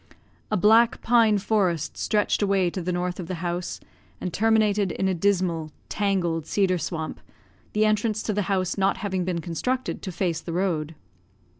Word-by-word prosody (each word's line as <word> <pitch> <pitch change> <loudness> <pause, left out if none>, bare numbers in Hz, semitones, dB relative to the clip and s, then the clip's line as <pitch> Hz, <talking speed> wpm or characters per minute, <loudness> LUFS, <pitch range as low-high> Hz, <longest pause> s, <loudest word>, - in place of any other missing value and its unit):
A - - +1
black 225 +5 +4
pine 225 -3 +4
forest 190 -6 0
stretched 210 0 +1
away 195 -3 +2
to 185 - -4
the 180 +1 -2
north 180 0 -2
of 175 - -5
the 185 - -3
house, 175 +1 -3 0.4
and 180 -2 -4
terminated 210 -3 +2
in 190 - -1
a 190 - +1
dismal, 175 -3 0 0.2
tangled 175 -6 0
cedar 185 -3 +1
swamp, 160 0 -4 0.5
the 215 +1 +3
entrance 215 0 +1
to 215 - -1
the 205 - 0
house 190 0 0
not 195 0 +2
having 190 -3 -2
been 175 -2 -2
constructed 250 +10 -2
to 190 - -5
face 170 -2 -1
the 165 - -6
road. 165 -4 -1
190 Hz, 170 wpm, -25 LUFS, 175-210 Hz, 0.5 s, black